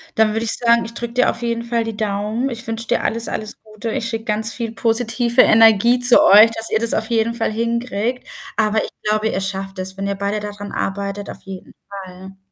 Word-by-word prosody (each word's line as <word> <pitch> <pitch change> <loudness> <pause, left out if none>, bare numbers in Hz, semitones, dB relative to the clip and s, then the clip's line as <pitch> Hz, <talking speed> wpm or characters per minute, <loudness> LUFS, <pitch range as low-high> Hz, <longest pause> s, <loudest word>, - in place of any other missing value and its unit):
Dann 220 -1 +3
würde 225 +1 -1
ich 225 - +1
sagen, 235 -1 +2
ich 230 - -8
drück 235 0 -6
dir 250 - +3
auf 235 - -9
jeden 235 -1 -2
Fall 235 0 -1
die 225 -2 -6
Daumen. 215 +4 -2
Ich 235 -1 -6
wünsch 225 +1 -4
dir - - 0
alles, 230 +1 -1
alles 215 0 -5
Gute. 215 +1 -7
Ich 230 - -2
schicke 225 -1 -4
ganz 220 0 -2
viel 230 -2 -4
positive 235 +2 +2
Energie 225 +2 +5
zu 245 0 +5
euch, 215 +3 +7
dass 225 0 -3
ihr 220 - +1
das 230 0 0
auf 220 0 -1
jeden 230 0 +1
Fall 225 -2 -2
hinkriegt. 235 +1 -2 0.3
Aber 215 0 +1
ich - - -6 0.2
glaube, 215 +1 +1
ihr 190 - -2
schafft 195 0 -4
das, 190 +1 -3
wenn 195 - -3
ihr 200 - -2
beide 200 +2 -2
da 210 0 -6
dran 205 0 -9
arbeitet, 200 +1 -4
auf - - -9
jeden 190 -1 -10 0.2
Fall. 190 -1 -10
220 Hz, 230 wpm, -19 LUFS, 205-235 Hz, 0.3 s, euch